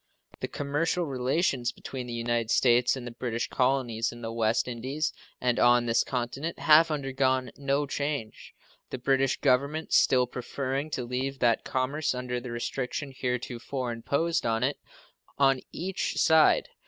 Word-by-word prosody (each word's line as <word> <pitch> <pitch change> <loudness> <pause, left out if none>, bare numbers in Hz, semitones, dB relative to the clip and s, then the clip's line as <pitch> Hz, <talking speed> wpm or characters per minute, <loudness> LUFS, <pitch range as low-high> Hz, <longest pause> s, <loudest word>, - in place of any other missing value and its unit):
The - - -3
commercial 150 +5 -1
relations 130 -1 0
between 130 -2 -7
the 120 - -5
United 115 -1 -1
States 120 +1 +4
and 130 -2 -7
the 120 - -6
British 120 0 -3
colonies 125 -3 0
in 120 0 -11
the 115 - -3
West 115 +1 +1
Indies 130 +6 -2 0.3
and 125 -1 +1
on 120 0 +5
this 115 -1 +2
continent 130 +6 -3
have 160 +2 +6
undergone 135 -3 0
no 140 +1 0
change, 140 -5 -4 0.3
the - - -4
British 135 +1 +1
Government 140 +5 +1
still 125 -1 +5
preferring 135 +4 -4
to 130 -4 -3
leave 130 +3 -3
that 120 -3 +2
commerce 130 +2 -1
under 125 -1 -3
the 125 +1 -8
restriction 125 +4 -3
heretofore 125 0 -3
imposed 140 +9 -1
on 115 0 0
it 140 +3 0 0.6
on 135 -2 +3
each 185 +2 -3
side. 160 -1 +4
130 Hz, 150 wpm, -28 LUFS, 120-140 Hz, 0.6 s, have